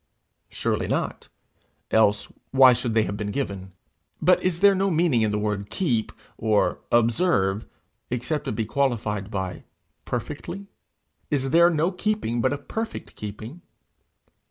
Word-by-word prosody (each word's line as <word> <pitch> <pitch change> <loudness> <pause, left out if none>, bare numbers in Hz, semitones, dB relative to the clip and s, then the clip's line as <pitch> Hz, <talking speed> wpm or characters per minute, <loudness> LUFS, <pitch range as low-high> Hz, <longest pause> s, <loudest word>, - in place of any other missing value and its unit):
Surely - - -1
not - - -2 0.6
else 105 -2 +2 0.2
why 130 -1 +7
should 120 -2 -2
they 110 - +4
have 100 - -3
been 105 0 -3
given? 100 -6 -4 0.5
But 180 +2 +4
is 180 -1 -1
there 200 0 +7
no 195 +1 +1
meaning 160 -8 +2
in 110 - +2
the 105 - 0
word 105 -1 -2
keep, 125 - 0 0.3
or 105 -8 +2
observe, 115 - +2 0.4
except 140 +5 -2
it - - -1
be 110 - -1
qualified 110 -6 -1
by 95 -3 -4 0.4
perfectly? 200 +2 -5 0.6
Is 135 -3 0
there 170 +2 +6
no 165 +2 +1
keeping 180 - -1
but 130 - +2
a 145 - -1
perfect 220 +10 -6
keeping? 110 +10 -8
120 Hz, 140 wpm, -25 LUFS, 105-165 Hz, 0.6 s, why